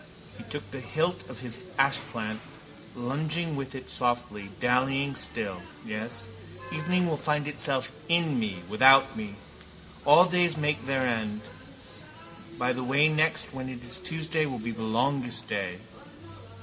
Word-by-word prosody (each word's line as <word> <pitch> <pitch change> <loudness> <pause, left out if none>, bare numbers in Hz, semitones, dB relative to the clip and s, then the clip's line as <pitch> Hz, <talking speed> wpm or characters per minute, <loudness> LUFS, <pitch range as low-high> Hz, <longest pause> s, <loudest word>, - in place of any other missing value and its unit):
He - - -10
took 145 0 -7
the 135 - -6
hilt 155 +8 -1
of 130 - -9
his 125 -1 -5 0.2
ashplant, 115 -6 +1 0.6
lunging 155 +6 -1
with 135 -1 -5
it 130 -1 -8
softly, 120 -5 -1
dallying 135 +3 +2
still. 100 -7 -3 0.2
Yes, 115 +2 -4 0.5
evening 175 +3 +1
will 160 -3 0
find 150 -1 0
itself 135 -3 -1 0.2
in 165 -6 +3
me, 100 -6 -3
without 135 +5 +7
me. 105 -2 -6 0.7
All 150 +5 +8
days 175 -2 +2
make 150 -5 0
their 135 -1 +1
end. 110 -3 -1 1.2
By 125 +1 +1
the 130 +1 -3
way 140 +4 +4
next 155 -1 +1
when 130 -1 -5
is 125 +4 -4
it - - -13
Tuesday 160 -2 0
will 130 -3 -4
be 115 +1 -4
the 115 - -7
longest 120 +1 +1
day. 95 -5 -2
130 Hz, 145 wpm, -28 LUFS, 115-150 Hz, 1.2 s, All